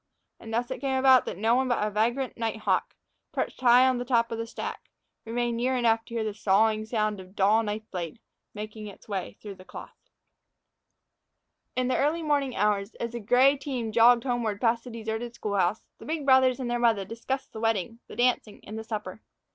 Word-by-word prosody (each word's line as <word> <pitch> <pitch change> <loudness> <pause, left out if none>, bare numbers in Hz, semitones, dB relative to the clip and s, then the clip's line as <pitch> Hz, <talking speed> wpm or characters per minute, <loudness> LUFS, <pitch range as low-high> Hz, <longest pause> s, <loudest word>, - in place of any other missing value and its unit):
And 225 - -10
thus 240 +2 -1
it - - -5
came 270 -1 0
about 260 -1 +6
that - - -5
no 225 +3 +2
one 260 +1 +2
but 245 -4 +1
a 210 - -2
vagrant 235 +5 0
night 225 -1 -2
hawk, - - 0 0.4
perched - - -3
high 250 +1 +6
on 255 -1 +1
the - - -2
top 235 -2 +1
of 230 - -3
the 230 - -3
stack, - - -6 0.4
remained 235 +1 -1
near 255 +2 +1
enough 225 -2 +2
to 235 - -9
hear 225 - 0
the 215 -1 -3
sawing 215 +1 +2
sound 215 -3 -1
of 185 - -10
a 185 - -21
dull 205 +3 +3
knife 215 0 -3
blade, 175 +1 -5 0.4
making 215 0 -7
its 200 - -13
way 195 -3 -4
through 200 -3 -9
cloth. 185 - -12 1.7
IN 255 0 0
the 255 - +1
early 310 +4 +1
morning 285 -4 0
hours, 205 0 0
as 235 - -4
the 235 - -5
gray 250 +6 +4
team 260 -5 -4
jogged 235 +1 +6
homeward 240 -5 -1
past 230 0 +1
the - - -7
deserted 230 +1 -5
school 210 -3 -3
house, 190 +2 +1
the - - -11
big 310 -2 -3
brothers 260 -1 +5
and 255 - -3
their 240 0 -1
mother 225 -5 +2
discussed 235 +6 -5
the 220 - -6
wedding, 225 0 -1
the - - -10
dancing, 240 -3 +1
and 220 +1 -7
the - - -6
supper. 215 -2 -6
230 Hz, 210 wpm, -27 LUFS, 215-250 Hz, 1.7 s, about